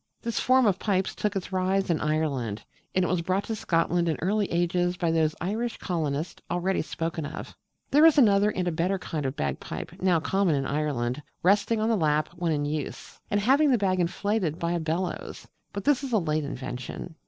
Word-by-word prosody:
This 230 -1 -1
form 260 0 +4
of 195 -3 +2
pipes 195 -3 0
took 210 -1 -2
its 190 -1 -3
rise 190 0 +1
in 160 - 0
Ireland: 140 -9 -1 0.3
and 185 -1 +3
it - - 0
was 175 0 0
brought 185 +4 0
to 225 - -3
Scotland 170 -2 +1
in 160 - 0
early 200 +3 0
ages 175 +1 +1
by 170 -2 +1
those 160 -1 +2
Irish 220 +6 -2
colonists 160 -3 -3
already 175 +2 0
spoken 165 0 -3
of 145 - -5
(page - - -8
11). - - -18 0.4
There 295 +3 +6
is 320 - +4
another 205 -5 +5
and 185 -3 -2
a - - +1
better 175 +4 0
kind 155 -6 -3
of 130 - -4
bagpipes, 70 -2 -4
now 180 -3 +3
common 190 0 +1
in 135 -1 -1
Ireland, 140 -3 -1 0.2
resting 205 +4 +3
on 220 +1 +1
the 230 - +3
lap 155 -4 +1
when 170 -1 -1
in 145 -2 0
use, 150 -1 -5
and 205 - +2
having 275 +8 +4
the 255 - +4
bag 190 -3 +1
inflated 180 -1 0
by 170 0 -1
a 175 - 0
bellows: 165 +3 -3 0.2
but 200 - -5
this 290 -1 +2
is 265 -3 -4
a - - +5
late 155 -5 0
invention. 130 +4 -6
175 Hz, 210 wpm, -27 LUFS, 155-200 Hz, 0.4 s, There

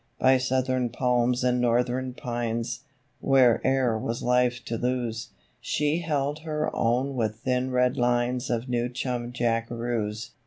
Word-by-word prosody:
By 130 0 +4
Southern 130 -1 0
palms 125 0 +1
and 125 -1 +2
Northern 125 +1 0
pines 120 -2 -3 0.4
Where'er 130 -2 +3
was 115 +2 -3
life 125 0 +1
to 115 - -3
lose 120 -1 -2 0.3
She 150 +2 0
held 150 -3 -1
her 155 -1 -3
own 125 +4 +1
with 110 -3 -2
thin 125 +1 0
red 125 0 +2
lines 120 +1 +1
Of 120 +1 -1
New 120 -1 0
Chum 125 -1 -3
Jackaroos. 115 -2 -2
125 Hz, 130 wpm, -26 LUFS, 120-130 Hz, 0.4 s, By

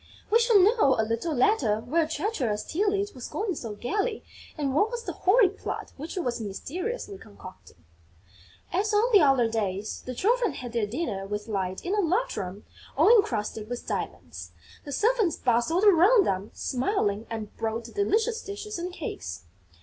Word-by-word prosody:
We 460 - +6
shall 470 -2 +5
know, 390 - +4
a 220 - +2
little 230 +8 -2
later, 245 - +2
where 310 +7 +1
treacherous 295 - -2
Tylette 405 +3 0
was 250 -2 -7
going 410 -2 -2
so 230 -8 -6
gaily 415 - -2 0.3
and 280 -3 -1
what 410 +10 +3
was 475 0 -5
the - - -4
horrid 400 0 +3
plot - - -5
which 310 +4 -7
she - - -3
was 245 -7 -2
mysteriously 370 - -5
concocting. 185 - -14 0.9
As 415 +4 +1
on 455 +4 +3
the 405 - +8
other 270 -5 +4
days, 210 -2 -3
the 255 - -6
Children 460 - +2
had 245 -3 -7
their 230 -3 0
dinner 210 - -3
with 210 +2 -4
Light 190 -3 -3
in 365 - -1
a 420 - +1
large 385 +8 0
room 195 0 -6 0.3
all 375 - +7
encrusted 220 - 0
with 245 0 -5
diamonds. - - -5 0.3
The 290 - -6
servants 435 - +2
bustled 250 - +1
around 400 +2 +6
them 195 +2 -1
smiling 245 - -1
and 220 -2 -6
brought 225 +1 -2
delicious 435 - 0
dishes 410 -1 -6
and 355 +1 -4
cakes. 100 - -6
310 Hz, 170 wpm, -27 LUFS, -, 0.9 s, the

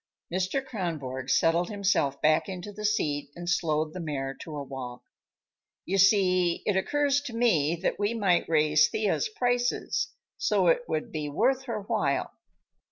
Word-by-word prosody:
Mr. 190 +9 -1
Kronborg 150 - -4
settled 170 +4 +2
himself 195 -9 0
back 155 +5 +3
into 185 +2 -6
the 210 +1 -6
seat 150 -10 0
and 175 0 -8
slowed 155 -2 0
the 185 - -6
mare 140 -5 -3
to 155 +2 -9
a 145 - -4
walk. 130 -2 -7 0.8
"You 195 +2 0
see, 185 -3 +3
it 205 - +1
occurs 285 +7 +1
to 275 -5 -7
me 170 -10 +2
that - - 0
we 205 +3 0
might 190 -7 +2
raise 155 -1 +4
Thea's 215 - 0
prices, 245 - 0 0.3
so - - +2
it - - +2
would 240 - -3
be 150 -4 -3
worth 260 - +1
her 230 -4 -3
while. - - 0
185 Hz, 160 wpm, -27 LUFS, 155-220 Hz, 0.8 s, raise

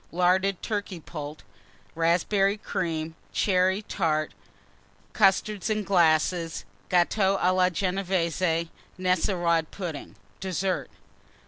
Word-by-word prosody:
Larded 185 +2 +2
Turkey 205 -4 -3
Poult. 150 -1 -8 0.5
Raspberry 190 +5 +2
Cream. 165 -6 -3 0.2
Cherry 190 +1 +2
Tart. 155 -6 -1 0.8
Custards, 205 +1 +2
in 215 -1 0
glasses. 165 -2 +2 0.2
Gâteaux 190 +2 +2
à 185 - +3
la 185 0 +4
Genévése. 180 -2 0 0.3
Nesselrode 175 -3 +1
Pudding. 170 -7 -6 0.2
DESSERT. 190 0 -2
180 Hz, 90 wpm, -26 LUFS, 165-195 Hz, 0.8 s, la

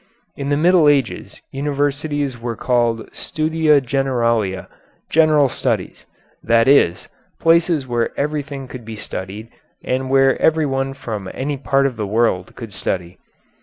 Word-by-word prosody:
In 140 0 -4
the 145 - +2
Middle 170 -1 +5
Ages 140 -4 -1
universities 145 0 -1
were 115 0 -4
called 120 -2 0
studia 155 -2 +1
generalia, 115 -7 0 0.5
general 155 -3 +4
studies - - -3 0.4
that 115 +1 +3
is, 135 -11 +3 0.3
places 165 -3 +3
where 120 -2 -1
everything 145 -2 -3
could 125 -1 -9
be 110 0 -8
studied 105 +1 -7 0.3
and 130 +1 -2
where 135 0 +3
everyone 135 -4 +1
from 110 -8 -6
any 145 +2 -2
part 135 0 +1
of 130 -4 -1
the 105 -2 -3
world 105 -4 0
could 115 -4 -9
study. 90 -1 -4
135 Hz, 130 wpm, -19 LUFS, 115-145 Hz, 0.5 s, Middle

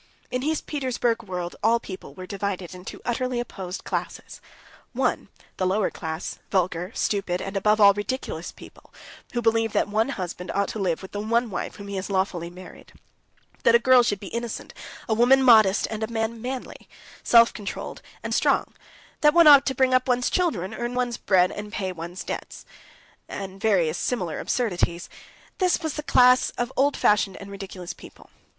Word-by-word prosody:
In 250 - -1
his 310 +3 -1
Petersburg 250 -5 -1
world 180 -4 -5
all 230 +2 +3
people 190 -5 -9
were 185 - -8
divided 195 -2 -4
into 180 +1 -10
utterly 250 +1 -1
opposed 190 -6 -6
classes. - - -5 0.5
One, - - 0 0.3
the 185 - 0
lower 195 +2 +1
class, 160 +1 -5
vulgar, 180 -1 0
stupid, 195 -3 -1
and, 195 +1 -6
above 210 +2 +2
all, 200 -1 +8
ridiculous 205 +6 -4
people, - - -16 0.4
who 240 -1 -1
believe 225 -1 +2
that - - +2
one 220 +5 +1
husband 180 -6 -5
ought 200 0 +1
to 220 - -5
live 180 -3 -1
with 190 - -9
the 205 - -4
one 230 +2 0
wife - - -4
whom 200 - -10
he 200 -1 -4
has 190 - -4
lawfully 190 -3 -1
married; 180 +1 -13 0.7
that 235 - +5
a - - +9
girl 255 0 +6
should 205 -4 0
be 195 - -8
innocent, 235 -1 -5 0.3
a 225 - +1
woman 250 +4 +5
modest, 220 -6 +6
and 220 0 -4
a 220 - -1
man 225 0 -3
manly, 255 +1 -6 0.3
self 230 0 +6
controlled, 205 -3 -6 0.2
and - - -3
strong; - - +1 0.5
that 300 +1 +4
one 340 -1 +7
ought 285 -2 +8
to 265 - 0
bring 260 0 +3
up 255 0 +3
one's 250 -1 +1
children, 225 - 0
earn 240 +1 -4
one's 245 -1 -1
bread, 185 -2 +3
and 210 0 -7
pay 190 -2 -3
one's 175 +1 -7
debts; - - -7 0.6
and 195 0 -7
various 180 -7 +2
similar 180 -11 -2
absurdities. 180 -7 -1 0.5
This 365 -2 +2
was 315 - -2
the 300 - -4
class 250 -3 +5
of 245 +1 -2
old 280 +2 +2
fashioned 205 -2 +2
and 200 0 -10
ridiculous 190 -3 -7
people. - - -15
210 Hz, 180 wpm, -25 LUFS, 190-245 Hz, 0.7 s, a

